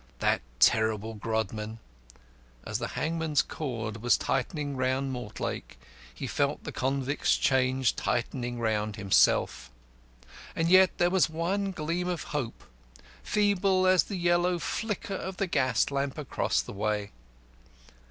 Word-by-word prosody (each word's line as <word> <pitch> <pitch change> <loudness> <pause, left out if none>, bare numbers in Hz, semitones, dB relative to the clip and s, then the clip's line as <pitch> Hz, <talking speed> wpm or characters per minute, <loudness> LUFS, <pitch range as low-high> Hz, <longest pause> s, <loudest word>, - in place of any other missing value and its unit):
That - - +1 0.2
terrible 110 - +3
Grodman! 110 0 -3 0.9
As - - -2
the - - -2
hangman's 160 -2 +1
cord 115 -7 -5
was 120 0 +4
tightening 145 +2 -2
round 130 +1 0
Mortlake, 120 - -5 0.3
he - - -7
felt - - -1
the - - -5
convict's 135 +2 0
chains 130 -1 +2
tightening 120 +2 -2
round 110 -2 -1
himself. 100 -3 +2 0.9
And 165 0 +1
yet 185 +1 +6
there 175 0 +3
was 185 -3 +3
one 185 +5 -1
gleam 170 +1 -2
of 180 -2 -2
hope, 130 -6 -3 0.6
feeble 195 - +2
as 185 -1 +5
the 200 - -4
yellow 175 0 +2
flicker 205 +4 -3
of 190 -1 -5
the 195 - +1
gas 130 -8 +1
lamp 140 0 -2
across 150 -3 0
the - - -9
way. 105 0 -2
135 Hz, 130 wpm, -28 LUFS, 115-175 Hz, 0.9 s, yet